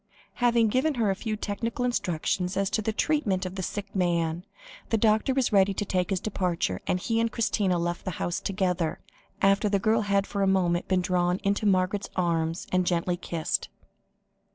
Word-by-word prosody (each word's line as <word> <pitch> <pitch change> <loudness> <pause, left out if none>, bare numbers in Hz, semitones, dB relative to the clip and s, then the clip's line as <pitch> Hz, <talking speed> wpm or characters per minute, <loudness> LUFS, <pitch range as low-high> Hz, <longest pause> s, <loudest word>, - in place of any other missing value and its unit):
Having 235 -2 +4
given 265 +6 +1
her 220 -5 +2
a - - -1
few 215 +2 -3
technical 225 +4 -3
instructions 180 -4 -1
as 195 0 0
to 215 - +1
the 220 - -1
treatment 215 -7 0
of 185 - -5
the 190 - -4
sick 200 +3 -5
man, 170 -2 0 0.5
the 225 - +2
doctor 220 +3 +3
was 260 -4 +1
ready 195 0 +4
to 205 - -2
take 180 -2 0
his 190 -2 0
departure, 180 - -1
and 180 - +1
he 225 +5 0
and 230 0 +1
Christina 205 -6 +1
left 175 0 -2
the - - -3
house 175 - -2
together, 180 -4 -1 0.4
after 195 +2 +4
the 200 - +2
girl 220 +3 +2
had 200 -1 +1
for 200 - -3
a 195 - +3
moment 180 -2 +1
been 185 -1 +2
drawn 180 0 +1
into 200 +1 +1
Margaret's 190 +1 +1
arms, 165 -1 0
and 185 -1 +1
gently 175 0 +1
kissed. 170 -2 -2
195 Hz, 190 wpm, -27 LUFS, 180-215 Hz, 0.5 s, Having